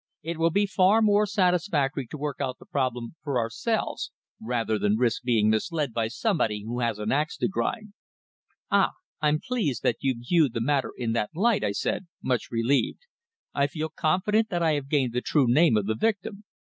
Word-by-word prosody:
It 165 +1 -4
will 165 +1 +4
be 200 +5 +2
far 195 +2 +4
more 210 0 +4
satisfactory 180 - +1
to 150 - -7
work 145 -1 -4
out 130 -2 -2
the - - -16
problem 125 -4 -2
for 140 -4 -1
ourselves, 120 - -2 0.3
rather 115 -2 -1
than 105 +1 +2
risk 120 +3 +1
being 115 -4 +2
misled 145 +3 -1
by 115 -1 0
somebody 115 - -1
who 120 +3 -4
has 115 -3 0
an 105 0 -2
axe 150 +4 0
to - - +1
grind." 210 +1 -3 0.8
"Ah! - - +3 0.3
I'm 150 0 +2
pleased 190 - -2
that 120 - +2
you 135 -2 0
view 145 +5 +2
the 115 - -4
matter 135 +3 0
in 120 -3 -2
that 105 -2 0
light," 220 +4 +2
I 100 - 0
said, 180 - -2 0.2
much 125 -3 -1
relieved. 120 +4 0 0.5
"I 140 0 +2
feel 155 +2 -4
confident 210 +9 +1
that 175 -3 -1
I 160 - +3
have 140 -2 -3
gained 135 -5 +1
the 125 - 0
true 145 0 +2
name 125 -1 +4
of 105 - 0
the 110 - 0
victim." 205 - -2
140 Hz, 195 wpm, -26 LUFS, 120-180 Hz, 0.8 s, will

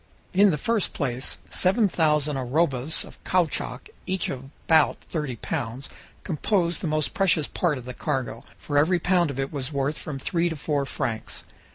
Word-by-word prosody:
In 200 +2 +6
the 155 - +1
first 220 +6 0
place, 130 -1 -2
seven 200 +4 +4
thousand 150 -4 +2
arrobas 135 +2 +1
of - - -15
caoutchouc, 180 -4 0 0.2
each 185 -1 -1
of 130 0 -5 0.2
about 160 -3 +4
thirty 150 -6 -3
pounds, 120 +3 -4 0.3
composed 175 +1 0
the 180 - -1
most 155 -1 0
precious 190 -8 +3
part 165 -5 0
of 125 - -9
the 125 - -6
cargo, 130 -4 -2
for 145 -1 +1
every 175 +5 +4
pound 175 -1 +2
of 135 -1 -5
it 135 +2 -2
was 140 0 -3
worth 140 +1 -1
from 150 -3 -5
three 170 +5 0
to 165 - -3
four 145 -1 -1
francs. 110 -3 -3
150 Hz, 175 wpm, -25 LUFS, 135-175 Hz, 0.3 s, In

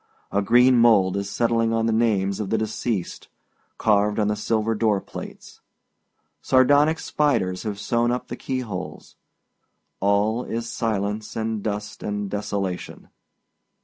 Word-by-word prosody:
A 100 - +1
green 125 +5 +5
mould 100 -5 +4
is 100 0 -3
settling 115 0 +1
on 115 0 +1
the 115 - +1
names 105 -4 +1
of 105 -3 -3
the 110 - +1
deceased, 110 -2 -3 0.5
carved 105 -1 +2
on 105 -1 +1
the 105 - 0
silver 110 +1 0
door 110 -2 +1
plates. - - -10 0.8
Sardonic 145 +5 +4
spiders 95 -16 0
have 105 -2 -4
sewed 120 +2 +1
up 125 +1 -2
the 120 - -5
key 130 +1 -3
holes. 95 -6 -7 0.8
All 105 +4 +1
is 115 +1 -4
silence 105 -2 -2
and 110 -1 -2
dust 105 0 -4
and 105 -1 -3
desolation. 100 -3 -4
110 Hz, 140 wpm, -23 LUFS, 100-115 Hz, 0.8 s, green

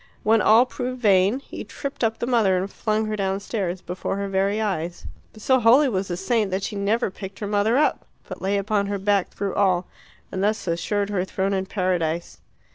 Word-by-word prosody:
When 220 0 +4
all 225 +4 +6
proved 255 0 -5
vain 205 +2 +3
he - - -8
tripped 280 -3 -6
up 225 0 +1
the - - -2
mother 225 -7 +3
and 190 +2 -3
flung 215 -1 -1
her 215 0 -2
downstairs 195 -2 -2
before 180 +2 -4
her 200 0 -2
very 195 +2 0
eyes. 175 -5 -3 0.3
But 215 - -14
so 260 -1 +4
holy 250 +5 +6
was 190 -4 -1
the 175 - -3
saint 210 +2 0
that 190 +1 -2
she 210 - -4
never 205 +2 0
picked 195 0 -9
her 215 - -4
mother 205 +4 +2
up, 300 - +1 0.2
but - - -8
lay 195 +2 0
upon 200 0 0
her 200 0 -2
back 200 -1 +1
through 200 -1 -4
all, 185 -3 +2 0.5
and 190 0 -2
thus 215 +2 0
assured 200 +4 -1
her 190 -3 0
throne 190 +1 -1
in 190 -1 -1
Paradise. 175 -4 -1
200 Hz, 205 wpm, -23 LUFS, 190-220 Hz, 0.5 s, all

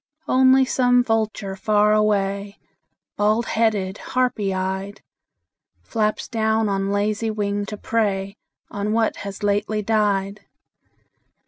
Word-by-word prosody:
Only 260 +1 +5
some 245 -1 +3
vulture 220 -4 -1
far 210 +1 +2
away, 200 -1 0 0.6
Bald 215 +3 +2
headed, 210 -4 0
harpy 245 -6 -1
eyed, 190 +2 -4 0.8
Flaps 215 -2 -1
down 220 -1 0
on 195 -1 -1
lazy 210 +2 0
wing 205 -1 -2
to 210 - -6
prey 200 -3 -1 0.4
On 205 +1 -2
what 225 -1 +1
has 200 0 -7
lately 210 +1 0
died. 205 -2 0
210 Hz, 110 wpm, -22 LUFS, 200-220 Hz, 0.8 s, Only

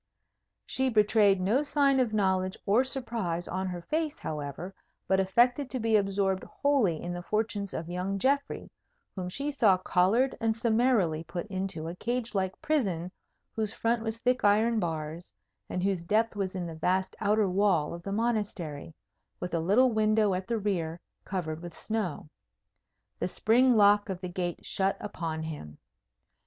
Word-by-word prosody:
She 265 0 0
betrayed 210 -3 +4
no 210 +9 +2
sign 285 -2 +3
of 245 -4 +2
knowledge 190 -3 +1
or 215 +6 +4
surprise 230 -10 -2
on 190 +1 -2
her 175 -2 -5
face, 310 - -1
however, 150 +4 -5 0.3
but 190 0 +3
affected 245 +8 +2
to 255 - -3
be 225 -1 +2
absorbed 195 -2 +1
wholly 260 - +1
in 175 0 -4
the 175 - -5
fortunes 210 0 -2
of 165 - -4
young 180 +3 -2
Geoffrey, 275 +6 0 0.4
whom 180 -2 -4
she 280 +10 -2
saw 220 -9 +4
collared 195 +8 +2
and 225 -1 +1
summarily 225 -8 +2
put 175 +2 -5
into 185 -4 -3
a 170 - -5
cage 235 +3 -2
like 190 -2 -1
prison 190 - 0 0.4
whose 220 -1 -1
front 230 0 0
was 225 0 -2
thick 250 +2 +1
iron 220 +3 +4
bars, 165 -1 -4 0.4
and 180 - -2
whose 190 -3 0
depth 220 +5 +1
was 195 -2 -2
in 180 -2 -3
the 165 - -6
vast 185 +4 0
outer 210 0 +2
wall 185 -5 +2
of 170 - -7
the 195 - -5
Monastery, 200 -9 -2 0.4
with 180 - -5
a 165 - +1
little 215 +10 +4
window 215 -2 +3
at 185 +1 -3
the 230 - 0
rear, 175 -6 -2 0.3
covered 165 -4 -3
with 175 -2 -9
snow. 215 -9 -3 0.9
The - - 0
spring 245 +2 +3
lock 205 0 +5
of 190 -2 -3
the 180 -1 -5
gate 175 -1 -4
shut 195 0 0
upon 165 -6 -4
him. 145 - -7
195 Hz, 165 wpm, -29 LUFS, 175-225 Hz, 0.9 s, lock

